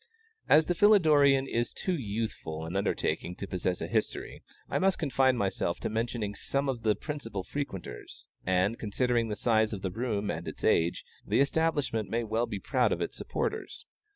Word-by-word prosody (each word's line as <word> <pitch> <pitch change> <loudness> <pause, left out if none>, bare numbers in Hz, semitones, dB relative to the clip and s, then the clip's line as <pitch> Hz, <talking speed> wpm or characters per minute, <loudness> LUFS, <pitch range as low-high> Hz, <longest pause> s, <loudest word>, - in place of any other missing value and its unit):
As 155 +1 +7
the 175 - +1
Philidorean 155 -9 +5
is 120 -1 -1
too 185 - -1
youthful 105 - -4
an 85 +3 -5
undertaking 95 -2 -1
to 100 - -5
possess 90 -1 -2
a - - -2
history, - - -2 0.3
I - - 0
must 190 0 +3
confine 130 -4 +2
myself 95 -4 -1
to - - -2
mentioning 115 -2 -2
some 140 +6 -2
of 130 -4 -2
the 110 -2 +2
principal 115 -11 -5
frequenters, 95 - -6 0.2
and, 95 +5 +1
considering 120 +2 +1
the 105 - -3
size 110 -1 +2
of 95 - -6
the 95 - -1
rooms 105 -2 -1
and 85 +3 -5
its - - -7
age, 85 +1 +2 0.2
the - - +1
establishment 140 -8 +1
may 115 +2 0
well 115 +2 0
be 105 -3 -4
proud - - +1
of - - 0
its - - -3
supporters. 455 - -3
115 Hz, 180 wpm, -29 LUFS, 100-140 Hz, 0.3 s, As